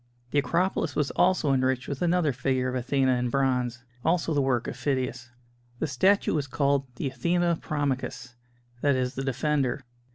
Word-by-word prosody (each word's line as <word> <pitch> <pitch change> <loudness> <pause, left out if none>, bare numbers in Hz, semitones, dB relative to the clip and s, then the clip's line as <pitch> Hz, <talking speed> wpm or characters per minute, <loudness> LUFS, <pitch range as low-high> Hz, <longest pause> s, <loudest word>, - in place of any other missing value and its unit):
The 145 - +3
Acropolis 175 +6 0
was 145 -2 0
also 180 -6 +2
enriched 130 0 +1
with 140 -2 -4
another 175 -4 +2
figure 130 0 0
of - - -4
Athena 130 0 +1
in 125 0 -1
bronze 125 -2 0 0.2
also 165 -1 +1
the 145 - +2
work 130 -3 0
of - - -4
Phidias. 130 -3 -2 0.5
The 160 - -1
statue 190 +9 +2
was 145 -3 -1
called 140 0 +1
the - - -4
"Athena 170 +5 0
Promachus"; 135 -4 -3 0.5
that 140 -1 +3
is 130 0 -1
"The 135 - -4
Defender." 140 0 0
135 Hz, 165 wpm, -27 LUFS, 130-150 Hz, 0.5 s, The